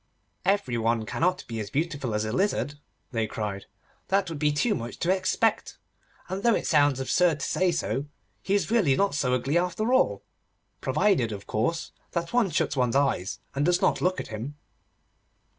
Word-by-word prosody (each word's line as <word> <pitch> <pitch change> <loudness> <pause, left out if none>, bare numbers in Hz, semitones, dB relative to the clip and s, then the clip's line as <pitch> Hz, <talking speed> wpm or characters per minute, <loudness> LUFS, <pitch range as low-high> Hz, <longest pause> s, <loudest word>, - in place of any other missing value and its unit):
'Every 180 -12 +1
one 115 0 +1
cannot 180 +10 0
be 115 -1 -4
as 105 -2 -4
beautiful 145 -5 -2
as 105 0 0
a 110 - -2
lizard,' 145 - 0 0.3
they 115 -3 0
cried; 105 -2 -4 0.4
'that 195 -1 +1
would 160 -3 -5
be 150 0 +3
too 210 +10 +1
much 120 - -5
to 180 +3 +2
expect. 200 +4 0 0.5
And, 190 +1 -4
though 235 0 +4
it - - -2
sounds 145 -3 +3
absurd 160 +3 +2
to - - -1
say 185 -1 +2
so, 140 -5 -1 0.4
he 195 - 0
is 205 - 0
really 190 - +4
not 200 +1 +1
so 130 -3 +1
ugly 135 +7 +1
after 200 +7 0
all, 100 - +2 0.6
provided, 150 - +2
of 100 -1 -7
course, 145 +10 -1 0.2
that 170 +2 -2
one 240 -5 +3
shuts 155 - 0
one's 125 -2 +1
eyes, 135 -9 0
and 140 - 0
does 175 +2 +3
not - - +2
look 185 +1 +1
at - - -6
him. 115 +7 -6
145 Hz, 185 wpm, -27 LUFS, 120-185 Hz, 0.6 s, though